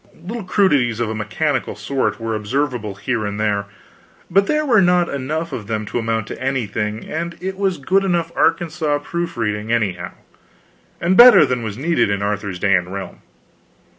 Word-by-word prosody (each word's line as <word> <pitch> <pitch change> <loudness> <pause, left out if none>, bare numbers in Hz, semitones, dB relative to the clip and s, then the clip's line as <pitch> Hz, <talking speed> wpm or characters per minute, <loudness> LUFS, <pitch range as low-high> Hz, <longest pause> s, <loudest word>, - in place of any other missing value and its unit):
Little 220 +5 -6
crudities 145 - +2
of 115 -2 -1
a - - -2
mechanical 120 +6 -2
sort 135 -3 -2
were 115 0 -3
observable 110 -1 -2
here 110 +3 -2
and 105 0 -4
there, 105 -2 0 0.7
but 195 +3 +3
there 305 0 +1
were 230 -7 +4
not 180 -1 +3
enough 150 +4 -3
of 110 -6 -5
them 110 -1 -2
to 120 - -3
amount 115 -1 -1
to - - -8
anything, 110 -5 -2
and 170 +2 -4
it 190 +1 -4
was 195 -2 0
good 190 +8 +1
enough 170 -3 0
Arkansas 160 -3 +1
proof 170 -1 -4
reading, 105 -1 -2
anyhow, 95 -7 -1 0.9
and 180 +2 +1
better 240 -8 +9
than 125 -3 -1
was 110 -2 -5
needed 160 -3 +1
in 100 0 -1
Arthur's 100 -2 -2
day 100 +2 +2
and 90 -1 +1
realm. 100 0 -7
125 Hz, 175 wpm, -20 LUFS, 105-170 Hz, 0.9 s, better